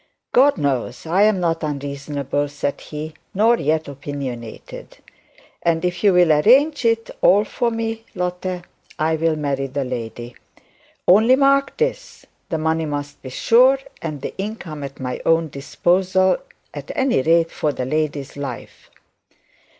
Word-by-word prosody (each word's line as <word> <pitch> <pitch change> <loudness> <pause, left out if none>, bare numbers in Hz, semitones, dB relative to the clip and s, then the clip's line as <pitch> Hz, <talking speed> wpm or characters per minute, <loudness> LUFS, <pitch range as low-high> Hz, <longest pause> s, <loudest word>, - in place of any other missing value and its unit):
'God 275 -1 +5
knows 135 -4 -2
I 175 +5 +2
am 210 -2 +4
not 165 -2 0
unreasonable,' 145 -1 -3
said 145 0 -3
he, 155 +1 -7 0.2
'nor 230 +4 +4
yet 155 +2 0
opinionated; 135 -5 -7 0.6
and 165 0 +1
if 180 +2 -2
you'll 180 -5 +5
arrange 260 - +4
it 230 0 +1
for 210 +5 +3
me, 225 0 -3
Lotte, 180 0 -3 0.3
I'll 160 +1 +1
marry 140 -2 -2
the 135 +1 -3
lady. 120 -1 -6 0.7
Only 220 +8 +6
mark 275 0 +2
this: - - -3 0.2
the 165 - -1
money 160 0 0
must 145 -1 -5
be 130 - -8
sure, 250 - +4 0.2
and 150 -4 -5
the - - -5
income 190 -7 -5
at 140 -1 -8
my 125 -1 -4
own 165 -1 +2
disposal, 185 +7 +1 0.4
at - - -8
any 265 - +2
rate 165 +3 +3
for 150 - -1
the 130 -2 -4
lady's 150 -1 -2
life.' 140 -4 -7
160 Hz, 135 wpm, -21 LUFS, 140-200 Hz, 0.7 s, Only